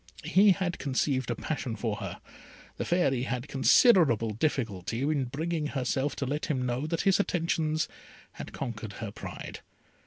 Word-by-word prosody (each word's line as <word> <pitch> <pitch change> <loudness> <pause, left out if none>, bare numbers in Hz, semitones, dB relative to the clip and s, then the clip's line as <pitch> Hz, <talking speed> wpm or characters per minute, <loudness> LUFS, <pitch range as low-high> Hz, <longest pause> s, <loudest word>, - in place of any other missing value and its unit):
He 200 +2 +5
had 180 -2 -2
conceived 130 -1 0
a 120 - 0
passion 130 -3 -3
for 105 0 -2
her. - - -6 0.6
The - - -2
Fairy 155 -8 +2
had 125 +1 -3
considerable 135 - +5
difficulty 115 - -1
in 145 -2 +1
bringing 155 +4 -2
herself 135 0 -1
to 140 - -2
let 145 +6 -2
him 130 -6 -1
know 125 +4 -1
that 165 +1 -1
his 195 -1 +3
attentions 160 -4 0 0.4
had - - -8
conquered 110 -5 -5
her 110 -3 -6
pride. 115 - -8
135 Hz, 155 wpm, -29 LUFS, 120-160 Hz, 0.6 s, He